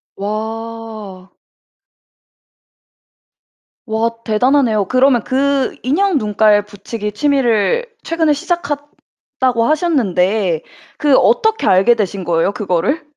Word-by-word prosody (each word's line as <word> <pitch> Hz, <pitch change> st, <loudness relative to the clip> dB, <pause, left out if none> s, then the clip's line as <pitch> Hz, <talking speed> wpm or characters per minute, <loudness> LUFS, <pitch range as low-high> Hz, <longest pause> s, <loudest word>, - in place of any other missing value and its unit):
와. 215 Hz, -2 st, -6 dB, 2.5 s
와 225 Hz, 0 st, 0 dB
대단하네요. 225 Hz, -1 st, +2 dB
그러면 255 Hz, -1 st, +3 dB
그 275 Hz, 0 st, 0 dB
"인형 340 Hz, +7 st, +1 dB
눈깔 210 Hz, -2 st, +2 dB
붙이기 210 Hz, +1 st, -6 dB
취미를 265 Hz, -, +1 dB, 0.2 s
최근에 325 Hz, -2 st, 0 dB
시작했다."고 290 Hz, -6 st, -3 dB
하셨는데 205 Hz, -, +1 dB, 0.4 s
그 290 Hz, -3 st, +3 dB
어떻게 445 Hz, -2 st, +2 dB
알게 195 Hz, +6 st, +4 dB
되신 200 Hz, -3 st, -3 dB
거예요? 170 Hz, +3 st, 0 dB
그거를? 210 Hz, -, -1 dB
230 Hz, 215 characters per minute, -16 LUFS, 205-280 Hz, 2.5 s, 알게